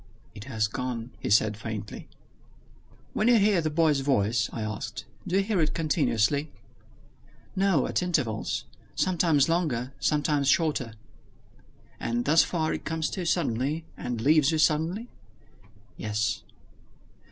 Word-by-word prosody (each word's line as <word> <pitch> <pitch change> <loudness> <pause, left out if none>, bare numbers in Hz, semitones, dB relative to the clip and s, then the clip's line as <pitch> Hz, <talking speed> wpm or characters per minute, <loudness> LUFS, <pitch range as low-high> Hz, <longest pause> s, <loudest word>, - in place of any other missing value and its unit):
"It 105 -1 -10
has 110 -5 0
gone!" 125 0 -4
he - - -4
said 105 +1 +4
faintly. 110 -1 -6 1.1
"When 215 - +1
you 240 -1 +6
hear 200 -4 +3
the 155 - -1
boy's 155 -2 +2
voice," 115 -6 +1
I 115 - -4
asked, 110 +1 -5 0.2
"do 180 - -1
you 195 - +3
hear 200 -3 0
it 155 - 0
continuously?" 145 -3 +1 1.1
"No, 190 -7 +2
at - - 0
intervals; 145 -12 -1 0.3
sometimes 165 -6 +2
longer, 150 -7 -1
sometimes 150 -2 +1
shorter." 145 -9 +1 1.0
"And 120 +1 -1
thus 160 +3 +6
far, 160 -3 -1
it - - -5
comes 160 0 -2
to - - -4
you 180 - -3
suddenly, 155 -1 0
and 120 -2 -4
leaves 150 +2 +4
you 160 - +1
suddenly?" 160 +9 +1 0.9
"Yes." 105 0 -1
145 Hz, 135 wpm, -27 LUFS, 115-165 Hz, 1.1 s, you